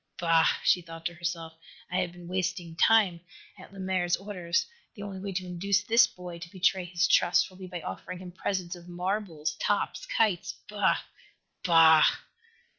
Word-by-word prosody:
"Bah!" 165 -2 +4
she 180 - +4
thought 165 -1 -11
to 175 - -1
herself. 170 -1 -4 0.4
"I 180 - 0
have 180 -2 -1
been 175 0 -12
wasting 180 -2 -3
time 195 -3 +4 0.4
at - - -13
Lemaire's 185 -2 -1
orders. 180 -4 -2 0.3
The 205 - -8
only 195 -2 -6
way 195 +1 -5
to 185 0 -3
induce 190 +3 0
this 230 +3 +5
boy 180 -4 -9
to 170 0 -9
betray 185 -1 +1
his 175 +1 +1
trust 175 +2 +3
will 185 - -16
be 190 -1 -8
by 175 -1 -6
offering 180 +4 -6
him 180 0 -9
presents 180 -1 -3
of 175 0 -14
marbles, 180 -3 -3
tops, - - -1
kites 210 - 0
bah! 205 -2 +2 0.7
_Bah! 165 -3 +7
180 Hz, 170 wpm, -28 LUFS, 170-190 Hz, 0.7 s, Bah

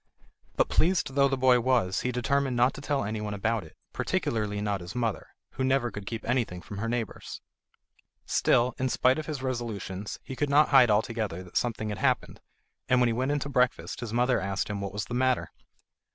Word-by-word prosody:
But - - +3
pleased 170 -5 +1
though 140 0 +4
the 135 -1 -1
boy 130 -1 +5
was, 115 -7 +1
he 125 - -1
determined 125 +1 0
not 125 +2 +4
to - - -9
tell 145 -3 0
anyone 105 0 -3
about 115 +1 -1
it, 80 - -15 0.2
particularly 105 -2 -1
not 100 -2 -1
his 85 +6 -8
mother, 115 -4 -2 0.2
who 130 - -3
never 130 -2 +1
could 100 0 -8
keep 115 -1 -5
anything 120 -7 0
from 100 +2 -8
her 115 +2 -2
neighbours. 120 -3 -4 0.9
Still, 125 0 +2
in 130 0 0
spite 130 +3 +3
of 155 - -6
his 145 -4 -4
resolutions, 110 -6 -4
he 130 - -7
could 145 +2 -1
not 145 +2 +5
hide 130 -4 +7
altogether 105 -4 0
that 90 - -16
something 110 -2 -1
had 105 -3 -4
happened, - - 0 0.5
and 125 - +4
when 125 -1 +4
he - - 0
went 130 +4 -1
in 145 - +1
to 140 - -3
breakfast 125 -2 0
his 120 -3 -5
mother 125 +2 +2
asked 95 +1 -2
him 100 -1 -3
what 100 -1 -4
was 105 0 -3
the 120 - -7
matter. 130 0 +1
120 Hz, 210 wpm, -28 LUFS, 105-130 Hz, 0.9 s, hide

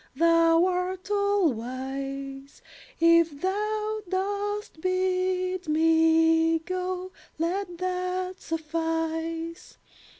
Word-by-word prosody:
Thou 330 +2 +4
art 370 +2 -2
all 405 -6 +2
wise; 270 +3 -6 0.4
If 335 -3 +4
thou 425 +4 -1
dost 405 -1 -2
bid 370 0 0
me 325 +1 +4
go, 365 +2 -4 0.3
Let 350 +2 -2
that 365 +1 -3
suffice. 325 +1 -3
335 Hz, 75 wpm, -27 LUFS, 325-370 Hz, 0.4 s, Thou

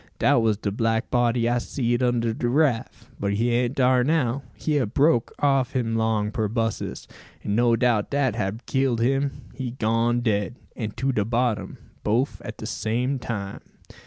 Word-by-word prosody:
Dat 120 - +4
was 110 -2 +2
de 100 -1 -2
black 115 +2 0
body 120 -1 +2
I 120 +1 +2
seed 120 -1 -1
under 120 -2 +1
de 120 +1 -1
raff; 135 -3 0
but 100 0 0
he 115 +4 +1
an't 120 +2 0
dar 125 -1 +4
now. 140 -3 +1
He 150 -2 0
hab 120 -6 -1
broke 140 -5 +3
off 135 -3 +2
him 115 -3 0
long 110 -2 +1
perbossus; 115 +1 -2 0.4
and 100 - -1
no 120 0 +4
doubt 115 -3 +1
dat 135 -6 +1
hab 105 +2 -3
killed 130 -3 +1
him. 135 +3 0
He 130 -2 -4
gone 115 0 +1
dead, 105 -1 0 0.2
and 110 -4 -5
to 135 +1 +1
de 105 -5 +1
bottom, 115 -3 -1 0.3
boaf 120 +6 0
at - - -7
de - - -7
same 125 +5 -1
time." 100 -5 -5
120 Hz, 175 wpm, -24 LUFS, 110-130 Hz, 0.4 s, Dat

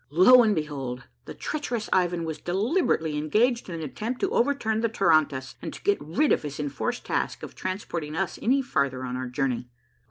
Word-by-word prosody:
Lo 185 - +7
and 215 -3 +3
behold! 135 -5 -4 0.2
the - - -8
treacherous 245 -7 -3
Ivan 175 -2 +2
was 160 -2 -4
deliberately 180 - 0
engaged 230 - +1
in 170 - -4
an 165 - -5
attempt 215 - -4
to - - +1
overturn 235 -4 +1
the 230 - +1
tarantass 155 -10 +2
and - - -5
to - - -12
get 205 -5 +2
rid 170 - +1
of - - +3
his 145 -1 -6
enforced 145 -2 -3
task - - -2
of - - -7
transporting 170 -5 -4
us 190 +1 -2
any 270 +4 +2
farther 140 - -1
on 125 0 -4
our 130 0 -3
journey. 125 -1 -2
170 Hz, 190 wpm, -26 LUFS, 145-220 Hz, 0.2 s, Lo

